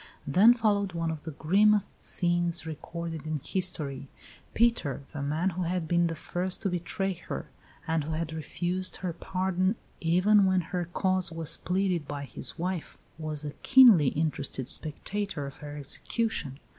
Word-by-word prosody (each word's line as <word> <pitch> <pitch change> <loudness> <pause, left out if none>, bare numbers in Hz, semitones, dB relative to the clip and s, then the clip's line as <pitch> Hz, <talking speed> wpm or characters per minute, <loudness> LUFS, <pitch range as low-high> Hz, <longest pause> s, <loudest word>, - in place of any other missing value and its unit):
Then 200 - +6
followed 205 -5 +1
one 165 -1 -1
of 155 -2 -7
the - - -4
grimmest 205 +5 +3
scenes 175 -1 +1
recorded 160 0 -6
in 155 0 -1
history. 150 -8 -1 0.5
Peter, 220 - +2
the 145 - -4
man 155 +7 0
who 180 +2 -4
had 175 -1 -1
been 170 +1 +3
the 165 - -3
first 180 +5 -2
to 195 - +1
betray 180 +2 -2
her, 165 - -7 0.3
and 160 -2 0
who 160 - -3
had 160 0 -3
refused 175 +4 -2
her 175 - -1
pardon 185 +3 0 0.2
even 185 +5 +4
when 185 -1 +3
her 175 +1 -3
cause 185 -1 +1
was 165 0 -1
pleaded 180 -4 0
by 145 -1 -4
his - - -5
wife, 180 -1 -3 0.2
was 155 -1 -4
a 145 - -3
keenly 240 - +8
interested 145 -3 -1
spectator 160 +3 -2
of 140 - -8
her 145 0 -8
execution. 145 - -2
170 Hz, 155 wpm, -29 LUFS, 155-185 Hz, 0.5 s, keenly